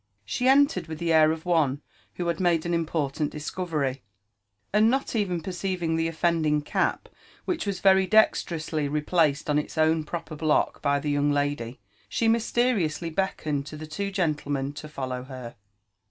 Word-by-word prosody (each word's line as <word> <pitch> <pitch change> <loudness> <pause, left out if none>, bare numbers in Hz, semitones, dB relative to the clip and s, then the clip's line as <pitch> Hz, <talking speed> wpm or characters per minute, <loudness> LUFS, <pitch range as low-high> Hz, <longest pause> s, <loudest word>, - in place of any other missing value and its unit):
She 250 - -1
entered 280 - +4
with 160 -1 -6
the 165 0 0
air 155 -1 +6
of 160 +1 -5
one 155 -5 +1 0.3
who 175 - -3
had 170 -1 -1
made 175 -3 +2
an 170 - -1
important 155 -3 -1
discovery, 150 -4 -3 0.7
and 215 +2 +5
not 270 0 -1
even 185 -6 0
perceiving 180 -2 -2
the 165 0 +1
offending 160 -2 +1
cap, - - -1 0.4
which 335 - -2
was 195 -2 -2
very 190 -1 +5
dexterously 165 -8 +2
replaced 150 0 +1
on 150 0 +2
its 150 - -6
own 160 0 +3
proper 160 0 -6
block 155 0 +1
by 140 -1 +2
the 145 +1 -2
young 145 0 +2
lady, 145 -4 -2 0.3
she 230 - 0
mysteriously 225 -8 +1
beckoned 155 -5 -2
to 155 - -8
the 155 - -7
two 200 +6 -3
gentlemen 145 -7 -1
to 150 +1 -8
follow 130 -3 -4
her. 130 -3 -8
160 Hz, 165 wpm, -26 LUFS, 150-180 Hz, 0.7 s, air